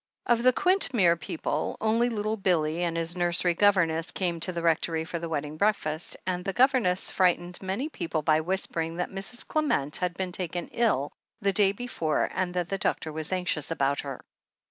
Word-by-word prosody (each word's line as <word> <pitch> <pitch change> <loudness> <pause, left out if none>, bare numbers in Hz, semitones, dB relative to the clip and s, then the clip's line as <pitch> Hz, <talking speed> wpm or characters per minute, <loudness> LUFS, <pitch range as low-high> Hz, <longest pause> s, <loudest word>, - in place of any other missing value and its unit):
Of 235 -1 +3
the 255 +1 +6
Quintmere 255 - +3
people, 160 -1 -3
only 225 +3 +2
little 215 -1 -1
Billy 170 -5 +1
and 170 -1 -1
his 165 +1 -1
nursery 175 0 +2
governess 170 -4 +3
came 175 -3 -2
to 170 +3 +2
the 170 -1 -4
Rectory 165 -1 +1
for 170 0 -4
the 165 0 -5
wedding 150 -1 -3
breakfast, 165 -5 0
and 180 -1 -2
the 195 - -2
governess 245 -8 +3
frightened 180 -1 +1
many 195 +9 -2
people 165 - -3
by 155 +1 +3
whispering 165 -2 -2
that 180 - -2
Mrs. 195 +5 -3
Clement 280 - 0
had 180 -1 -2
been 185 -1 -3
taken 175 -1 -4
ill 205 - +1 0.3
the 200 0 +1
day 195 -1 +4
before 200 -8 -1
and 185 -1 -1
that 175 -1 -1
the 195 - -2
doctor 155 -4 -1
was 155 +1 -5
anxious 180 -5 0
about 140 -3 0
her. 135 -3 -5
180 Hz, 185 wpm, -27 LUFS, 165-200 Hz, 0.3 s, the